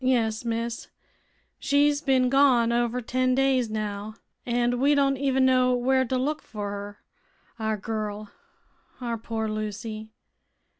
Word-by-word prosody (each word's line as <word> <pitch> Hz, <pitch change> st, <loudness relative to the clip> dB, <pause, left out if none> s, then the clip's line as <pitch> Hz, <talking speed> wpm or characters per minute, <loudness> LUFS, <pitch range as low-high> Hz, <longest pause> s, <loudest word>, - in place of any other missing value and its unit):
"Yes, 230 Hz, -4 st, +1 dB
miss. 230 Hz, 0 st, -3 dB, 0.7 s
She's 285 Hz, +1 st, +2 dB
bin 260 Hz, -3 st, +3 dB
gone 255 Hz, -4 st, +4 dB
over 240 Hz, +1 st, 0 dB
ten 255 Hz, +2 st, +1 dB
days, 265 Hz, -3 st, +2 dB
now, 215 Hz, 0 st, -4 dB, 0.3 s
an' 240 Hz, 0 st, +1 dB
we 285 Hz, +3 st, +4 dB
don't 275 Hz, -1 st, +3 dB
even 265 Hz, -1 st, +2 dB
know 255 Hz, -1 st, +4 dB
where 260 Hz, +2 st, +2 dB
to 255 Hz, +1 st, -1 dB
look 295 Hz, +4 st, -1 dB
fer 215 Hz, -, -16 dB
her; 205 Hz, 0 st, -7 dB, 0.6 s
our 220 Hz, -1 st, -1 dB
girl 210 Hz, 0 st, -4 dB, 0.7 s
our 235 Hz, -2 st, -3 dB
poor 225 Hz, 0 st, -3 dB
Lucy. 215 Hz, +1 st, -5 dB
240 Hz, 135 wpm, -26 LUFS, 220-260 Hz, 0.7 s, gone